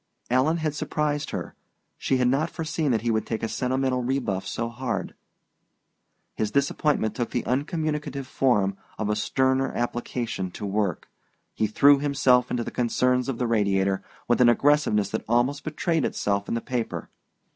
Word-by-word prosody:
Alan 135 +6 +3
had 155 -2 -1
surprised 150 -1 -1
her: - - -5 0.4
she 130 - 0
had 125 -1 +2
not 140 +6 +1
foreseen 155 -2 -2
that 115 -3 +1
he 120 - +1
would 110 -1 +1
take 115 -1 -3
a - - +1
sentimental 130 +1 0
rebuff 120 -7 -1
so 115 - -2
hard. 120 0 -3 1.2
His 110 - -1
disappointment 140 -2 +1
took 120 - -2
the 120 - -2
uncommunicative 150 +1 -2
form 105 -8 +1 0.2
of 105 -1 -1
a - - +1
sterner 130 +4 +1
application 120 -4 -2
to - - -6
work. 100 -3 -1 0.5
He 110 - 0
threw 140 +6 +5
himself 135 -3 +3
into 120 - -1
the - - -6
concerns 125 +2 +1
of 130 - -2
the 125 - 0
Radiator 100 -4 +1 0.3
with 120 +1 +3
an 120 - +7
aggressiveness 120 -6 +3
that 110 - -2
almost 130 +5 +2
betrayed 160 0 0
itself 100 0 -1
in - - -1
the 115 - -1
paper. 120 -2 -4
125 Hz, 165 wpm, -25 LUFS, 110-140 Hz, 1.2 s, an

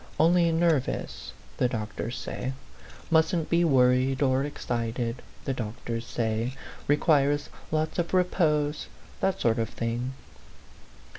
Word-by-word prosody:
Only 170 +1 +5
nervous, 165 -5 0 0.3
the 125 - +3
doctors 110 +1 -4
say; 130 - -4 0.6
mustn't 160 0 +2
be 170 0 +4
wor 130 -6 +5
15 130 +1 +2
ried 135 +1 -3
or 130 0 +3
excited, 120 -3 -3 0.2
the 135 - 0
doctors 115 0 -4
say; 115 +2 -1 0.3
requires 145 -1 +3 0.2
lots 155 +2 0
of 170 - -1
repose 155 -5 +1 0.3
that 190 - +1
sort 115 -1 +2
of 115 -1 -1
thing." 120 +3 -3
135 Hz, 125 wpm, -27 LUFS, 120-160 Hz, 0.6 s, Only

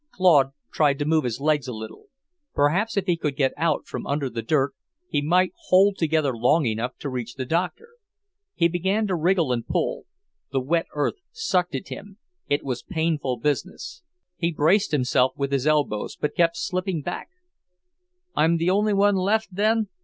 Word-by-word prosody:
Claude 150 -8 +4 0.2
tried 145 -3 +3
to 145 - -2
move 155 0 +2
his 120 0 -2
legs 150 -2 +1
a - - -3
little. 110 0 -9 0.5
Perhaps, 185 +10 +1
if 195 - +1
he 175 -3 +2
could 150 -4 -3
get 135 -2 +1
out 165 -3 0
from - - -6
under 140 -2 -1
the 115 - -3
dirt, 140 +3 +1 0.3
he 145 - 0
might 180 +5 +2
hold 195 +2 +5
together 155 -6 +1
long 130 +7 +3
enough 115 +2 -2
to - - -6
reach 125 -3 -5
the 130 - -4
doctor. 180 - -2 0.7
He 170 - +3
began 190 +5 0
to 190 -3 0
wriggle 170 -3 +2
and 120 -2 -1
pull. - - -2 0.4
The 135 - +1
wet 165 +6 0
earth 145 - 0
sucked 435 - 0
at - - -5
him; 200 0 -9 0.3
it 145 +1 +1
was 125 -3 -3
painful 160 -7 -1
business. 145 - -3 0.4
He 170 -1 0
braced 170 +6 +3
himself 130 -2 +2
with 140 0 -2
his 140 +1 0
elbows, 145 -9 0
but 150 - -2
kept 170 0 +2
slipping 185 -4 -2
back. 175 - -5 1.1
"I'm 165 +2 +3
the 170 +2 +1
only 205 +1 +2
one 200 0 +4
left, 205 +4 +1
then?" 215 +3 +2
160 Hz, 180 wpm, -24 LUFS, 140-185 Hz, 1.1 s, hold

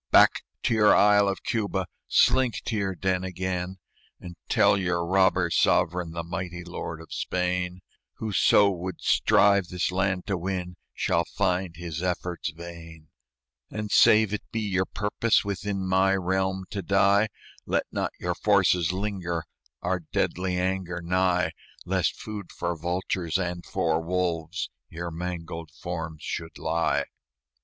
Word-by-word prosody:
"Back - - +6 0.2
to - - +2
your 105 -2 +6
isle 105 0 +5
of 100 - -2
Cuba! 100 -5 -1 0.2
Slink 130 -5 +4
to 115 - -1
your 95 -3 -1
den 95 0 0
again, 95 0 -3 0.4
And 90 -1 -9
tell - - +5
your 90 -3 0
robber 95 -1 +3
sovereign, 90 +1 +2
The 85 0 -3
mighty 85 0 -5
lord 85 -2 -6
of 80 - -10
Spain, 90 0 -1 0.3
Whoso 105 -1 +4
would 90 -1 -5
strive 100 -2 +4
this 90 0 -1
land 95 0 0
to 95 -3 -1
win 90 0 -3 0.2
Shall 85 - +1
find 90 -3 -1
his 85 -1 -5
efforts 90 -2 -2
vain. 85 -1 -11 0.6
"And, 105 -1 -5
save 110 0 +6
it 105 - -2
be 115 - -2
your 95 -3 0
purpose 105 +2 +1
Within 100 0 -2
my 95 +1 +3
realm 95 0 0
to 100 -4 -3
die, 100 +3 +3 0.4
Let - - +1
not - - -1
your - - -1
forces 90 -3 +3
linger 90 -4 -2 0.4
Our 90 +1 0
deadly 90 +2 -1
anger 90 -1 -1
nigh, 90 +1 +2 0.3
Lest - - 0
food 105 -4 -7
for 85 0 -3
vultures 85 0 -1
and 90 -2 -3
for 80 -1 0
wolves 85 +1 -2 0.2
Your 85 +1 -5
mangled 85 -1 -5
forms 80 +2 -6
should 80 0 -5
lie." 80 +1 0
90 Hz, 140 wpm, -26 LUFS, 85-95 Hz, 0.6 s, Back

